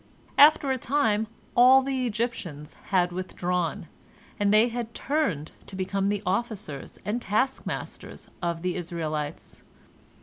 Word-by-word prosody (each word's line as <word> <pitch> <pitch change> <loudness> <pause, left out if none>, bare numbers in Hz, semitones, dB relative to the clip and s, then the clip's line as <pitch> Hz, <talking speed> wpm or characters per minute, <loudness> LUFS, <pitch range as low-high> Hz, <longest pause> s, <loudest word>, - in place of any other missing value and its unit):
After 290 -1 +7
a 260 - 0
time 225 -5 +1 0.3
all 260 +2 +7
the 260 -2 -1
Egyptians 205 -10 -4
had 180 -2 +2
withdrawn, 180 -1 -2 0.5
and 205 -1 +3
they 215 +3 +5
had 235 -1 -5
turned 235 - -1 0.2
to 195 - -8
become 195 +1 -1
the 205 -1 -1
officers 190 - -3
and 225 +4 -1
taskmasters 255 +6 -2
of 170 -1 -2
the 180 -1 -1
Israelites. 160 -4 -4
205 Hz, 125 wpm, -27 LUFS, 175-245 Hz, 0.5 s, After